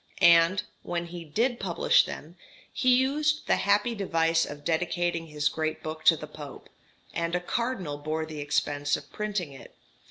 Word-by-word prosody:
And, 170 +3 +6 0.2
when 175 0 -3
he 170 0 -8
did 235 - 0
publish - - +3
them, - - -8 0.4
he 255 -3 +4
used 295 +4 +1
the - - +2
happy 205 +4 +2
device 165 -5 +1
of 145 0 -9
dedicating 170 0 0
his 150 -1 -1
great 155 +1 -2
book 155 0 -6
to 165 - +7
the 150 - -7
Pope, 150 -2 -11 0.4
and 170 0 -1
a - - +2
cardinal 185 - -3
bore 155 +2 -2
the 155 -1 -8
expense 145 0 0
of - - -13
printing 205 -8 -3
it. 135 - -13
170 Hz, 165 wpm, -27 LUFS, 155-205 Hz, 0.4 s, to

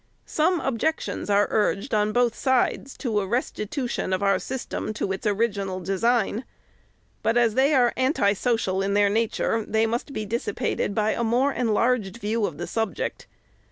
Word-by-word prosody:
Some 335 +3 +1
objections 270 0 -2
are 205 0 +4
urged, 210 +2 0
on 210 0 +2
both 240 0 +2
sides, 260 +1 0
to 225 -5 0
a 195 - -2
restitu 245 +3 -2
tion 190 - -2
of 185 +1 0
our 195 0 +3
system 255 -4 -4
to 200 - -2
its 195 +4 -2
original 200 -3 0
design; 215 +4 0 0.8
but, 225 +1 +1
as 235 -2 +3
they 275 +5 +3
are 245 -2 +4
anti 260 -6 +2
social 205 -4 0
in 200 +1 0
their 205 0 +4
nature 225 +1 0
they 220 +1 +1
must 235 +5 -2
be 215 -5 -4
dissipated 230 - -2
by 215 0 +2
a 235 - -1
more 250 +5 +2
enlarged 230 -3 +1
view 220 -1 0
of 150 - -8
the - - -4
subject. 225 -2 -3
225 Hz, 170 wpm, -25 LUFS, 205-245 Hz, 0.8 s, are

